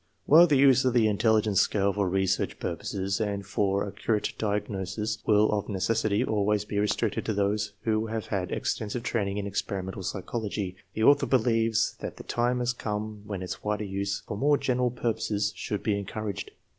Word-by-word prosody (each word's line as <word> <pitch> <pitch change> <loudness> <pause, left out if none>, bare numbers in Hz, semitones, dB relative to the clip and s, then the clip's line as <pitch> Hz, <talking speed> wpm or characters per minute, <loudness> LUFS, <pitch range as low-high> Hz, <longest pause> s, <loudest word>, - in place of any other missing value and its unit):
While 165 +4 +8
the 145 -4 +3
use 135 -1 +6
of 130 -2 +2
the 115 -3 +4
intelligence 110 -1 +3
scale 100 -1 +1
for 100 -2 0
research 95 0 0
pur - - -2
poses 100 +1 -3
and 100 -2 -2
for 100 0 0
accurate 105 +1 -1
diagnosis 105 0 -2
will 105 0 +4
of 105 -2 -1
necessity 110 +2 +1
always 105 -2 +1
be 105 -1 -2
restricted 105 +1 0
to 110 - 0
those 105 +1 0
who 110 0 0
have 110 -1 -3
had 95 -3 -2
extensive 110 +3 -2
training 100 -5 -1
in 100 - -2
experimental 95 -1 -3
psychology, 100 0 -3 0.2
the 110 - 0
author 140 +4 +5
believes 115 -3 +2
that - - -6
the - - -8
time 120 +1 0
has 125 0 0
come 105 -2 -4
when 100 -3 -4
its 90 - -6
wider 105 0 -1
use 100 0 -3
for - - -5
more 145 +6 +3
general 125 -2 +1
purposes 110 -3 -1
should 105 - -4
be 105 - +1
encouraged. 100 -1 -4
105 Hz, 180 wpm, -27 LUFS, 100-115 Hz, 0.2 s, While